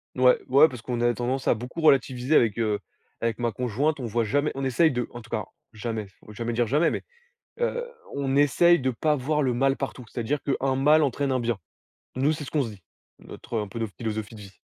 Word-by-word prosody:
Ouais 125 0 +5
ouais, 140 +5 +7
parce 125 -5 -9
qu'on 120 0 -3
a 120 0 +3
tendance 125 +3 -2
à - - +5
beaucoup 125 +8 -6
relativiser 135 -1 +3
avec, 115 -5 +4
heu, 105 -3 0 0.4
avec 115 -2 0
ma 120 -1 -1
conjointe, 125 +7 -1
on 125 - -4
voit 115 +2 0
jamais 145 +8 +1
on 135 - -3
essaye 155 +6 +3
de 125 -1 -2
en 120 - -8
tout - - -16
cas, - - -2 0.3
jamais, 110 0 -4
il 95 - -17 0.2
faut 105 - -11
jamais 115 +2 -3
dire 120 0 +2
jamais, 150 +8 +2
mais - - -3 0.6
heu, 485 0 0 0.3
on 135 -1 -1
essaye 160 +5 +5
de 130 0 +1
pas 150 +5 +1
voir 150 +3 0
le 130 - +1
mal 135 +3 +2
partout. 135 -2 -5
C'est-à-dire 120 +6 -2
qu'un 135 -1 0
mal 150 +3 +5
entraîne 140 0 0
un 130 -1 +1
bien. 115 -3 -1 0.6
Nous, 140 +4 +2
c'est 150 -1 -5
ce - - -8
qu'on 150 -3 +1
se 115 - -4
dit, 100 -4 -13 0.4
notre 115 -1 -6
un 105 -2 -3
peu 115 - -7
notre 110 -3 -3
philosophie 110 -2 -4
de 105 - -10
vie. 100 -1 -11
125 Hz, 235 wpm, -26 LUFS, 115-140 Hz, 0.6 s, ouais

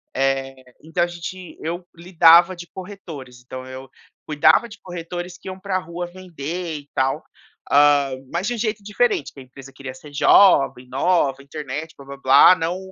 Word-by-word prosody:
Eh, 135 0 0 0.3
então 160 +3 -2
a - - 0
gente 175 +1 -8
eu 175 +2 -4
lidava 170 +1 +5
de 175 0 -10
corretores, 160 -10 -10
então 130 0 -8
eu 130 +1 -10 0.4
cuidava 155 +8 +4
de 210 - -12
corretores 175 0 -7
que - - -14
iam 185 0 -6
pra 190 -1 -2
rua 175 0 -6
vender 175 -2 -6
e 145 0 -18
tal, 130 0 0 0.5
hum, 140 -2 +3
mas 175 +3 -1
de 245 - -1
um - - -7
jeito 215 -2 -2
diferente, 210 - 0
que - - -13
a - - -10
empresa 135 +1 -14
queria 135 -1 -8
ser 145 +3 -14
jovem, 135 -5 +4
nova, 140 -1 +1
internet, 150 +2 -6
blá-blá-blá, 140 +4 +5
não 170 +1 -2
160 Hz, 165 wpm, -21 LUFS, 135-180 Hz, 0.5 s, lidava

